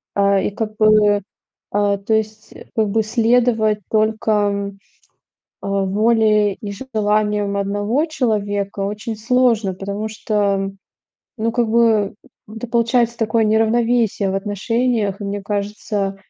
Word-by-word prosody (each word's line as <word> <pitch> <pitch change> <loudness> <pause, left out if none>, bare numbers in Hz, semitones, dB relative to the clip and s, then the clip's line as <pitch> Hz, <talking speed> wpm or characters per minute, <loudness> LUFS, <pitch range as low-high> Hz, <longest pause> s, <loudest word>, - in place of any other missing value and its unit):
А, 200 0 +3
и 190 - 0
как 215 +1 -4
бы, 215 -1 +4 0.5
а, 205 0 +1
то 200 +3 -2
есть, 215 0 -2 0.2
как 220 -2 +1
бы 220 +2 +1
следовать 225 -1 +2
только, 210 -2 +1 0.9
э, - - -6
воле 210 +1 +2
и 200 +1 -7 0.2
желаниям 210 -1 +1
1 205 +8 0
человека 205 -9 -2
очень 210 +3 -3
сложно, 225 -3 +1
потому 200 +3 -4
что, 200 -2 -1 0.7
ну, 225 +1 0
как 235 -1 +1
бы, 220 -3 +2 0.4
это 225 +2 -6
получается 235 0 +1
такое 225 0 +1
неравновесие 225 -1 +2
в - - -3
отношениях, 205 +1 -1
и 205 - -5
мне 200 0 -4
кажется, 205 -1 -3
215 Hz, 120 wpm, -19 LUFS, 200-225 Hz, 0.9 s, бы